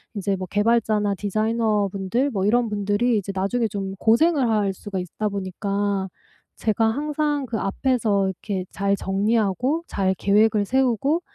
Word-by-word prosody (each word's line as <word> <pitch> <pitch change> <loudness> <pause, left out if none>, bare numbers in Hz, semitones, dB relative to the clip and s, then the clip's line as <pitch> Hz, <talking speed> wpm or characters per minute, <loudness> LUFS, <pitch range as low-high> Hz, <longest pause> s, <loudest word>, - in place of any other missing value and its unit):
인제 195 -1 -1
뭐 185 - -5
개발자나 210 0 +1
디자이너분들 215 +3 0
뭐 195 -3 -1
이런 235 +2 +3
분들이 210 +3 0
이제 200 0 -5
나중에 220 +5 0
좀 195 -1 -4
고생을 265 +3 +3
할 205 -3 +1
수가 200 +1 -7
있다 185 +4 -3
보니까 200 0 -2 0.5
제가 220 0 0
항상 295 +2 -1
그 225 -3 -3
앞에서 210 -1 +1
이렇게 190 0 -4
잘 200 0 0
정리하고 215 - 0
잘 190 -1 0
계획을 210 +1 +3
세우고 265 - +1
210 Hz, 310 characters per minute, -23 LUFS, 195-235 Hz, 0.5 s, 이런